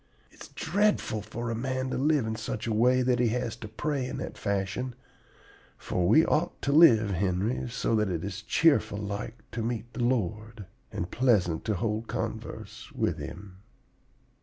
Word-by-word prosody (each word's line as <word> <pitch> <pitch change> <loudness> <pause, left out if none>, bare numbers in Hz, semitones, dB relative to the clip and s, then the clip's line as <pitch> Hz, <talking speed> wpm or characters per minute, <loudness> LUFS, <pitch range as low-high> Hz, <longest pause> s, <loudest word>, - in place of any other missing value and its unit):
It's - - -12
dreadful 180 - 0
for 120 +3 -5
a - - -1
man 130 +2 -2
to - - -1
live 145 -2 +2
in 110 0 -2
such 110 -1 -4
a 115 - -1
way 125 +4 +4
that 125 -1 +2
he 120 - +3
has 120 0 -1
to 110 - -8
pray 135 +4 -2
in - - -5
that - - -5
fashion; 100 +5 -2 0.8
for 90 -1 -1
we 155 - +6
ought 170 +3 0
to 140 - +1
live, 115 -10 +6
Henry, 95 +6 0
so 115 - -1
that 105 -2 +2
it 85 -3 -2
is 100 +1 -5
cheerful 135 -1 +3
like 105 +2 -5
to 115 - -3
meet 115 0 -3
the 120 - -2
Lord, 110 -3 -1 0.3
and 100 -4 -4
pleasant 100 -10 +2
to 110 - 0
hold 110 +3 -2
converse - - -5
with - - -1
Him. 95 +1 -8
115 Hz, 175 wpm, -28 LUFS, 100-125 Hz, 0.8 s, we